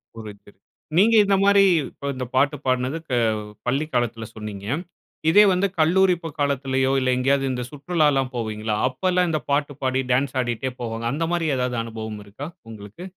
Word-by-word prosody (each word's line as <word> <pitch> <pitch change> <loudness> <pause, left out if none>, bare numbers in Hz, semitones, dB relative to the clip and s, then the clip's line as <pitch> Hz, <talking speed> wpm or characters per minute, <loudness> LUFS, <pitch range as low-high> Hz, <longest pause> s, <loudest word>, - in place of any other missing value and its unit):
புரிது. 105 -2 -11 0.5
நீங்க 225 +4 +5
இந்த 195 0 +3
மாரி 200 0 +6 0.3
இப்ப 140 - -6
இந்த 130 0 -4
பாட்டு 140 +3 +3
பாடுனது 130 +4 0
க - - -8 0.6
பள்ளி 140 +5 +1
காலத்தில 120 -2 -1
சொன்னீங்க. 105 -2 -7 0.6
இதே 205 +6 +7
வந்து 185 +2 +2
கல்லூரி 180 +3 +4
ப - - -4
காலத்திலேயோ, 135 -2 +1
இல்ல 130 0 0
எங்கயாவது 135 +2 +2
இந்த 125 -1 -3
சுற்றுலாலாம் 145 -3 +1
போவீங்கள்ல, 110 -2 -2
அப்பல்லாம் 180 +6 0
இந்த 155 -2 -1
பாட்டு 145 0 +1
பாடி, 130 0 +1
டான்ஸ் 130 +1 +1
ஆடிட்டே 120 +1 -2
போவாங்க. 115 -1 -4
அந்த 165 +3 -1
மாரி 165 -2 0
ஏதாவது 125 -1 -1
அனுபவம் 110 -2 -6
இருக்கா, 105 +8 -8 0.2
உங்களுக்கு? 105 - -10
130 Hz, 160 wpm, -23 LUFS, 115-155 Hz, 0.6 s, இதே